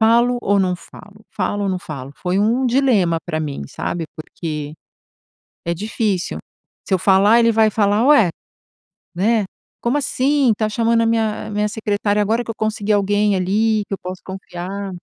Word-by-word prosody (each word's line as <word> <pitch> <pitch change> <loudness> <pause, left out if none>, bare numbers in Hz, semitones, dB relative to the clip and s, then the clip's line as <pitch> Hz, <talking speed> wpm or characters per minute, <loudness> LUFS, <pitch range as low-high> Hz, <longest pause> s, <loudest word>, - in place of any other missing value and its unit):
"Falo 235 +2 +4
ou 200 -3 +2
não 180 -1 0
falo? 205 +3 -15
Falo 205 +1 -2
ou 195 - 0
não 185 - -1
falo?", 140 -5 -8
foi 180 +1 -1
um 230 +6 +2
dilema 235 -10 +2
para 160 -2 -3
mim, 145 - -4
sabe, 170 -1 -4
porque 155 -1 -6 0.9
é 170 - -1
difícil. 205 -1 -2 0.5
Se - - -4
eu 185 - +2
falar, 195 +4 +5
ele 230 0 +4
vai 220 0 +4
falar: 210 +2 +2
"Ué, 280 - +6 0.8
né, 210 +4 +2 0.4
como 245 +5 +1
assim 275 -1 +2
está 215 0 -1
chamando 230 +1 +2
a 230 - +2
minha 225 -2 0
a - - -7
minha 210 0 0
secretária, 210 -1 0
agora 225 +4 0
que - - -6
eu 225 - -4
consegui 215 -1 -1
alguém, 205 0 +2
ali, 210 +4 +1
que - - -10
eu 195 - -7
posso 185 0 -7
confiar." 190 +1 -6
205 Hz, 175 wpm, -19 LUFS, 185-225 Hz, 0.9 s, Ué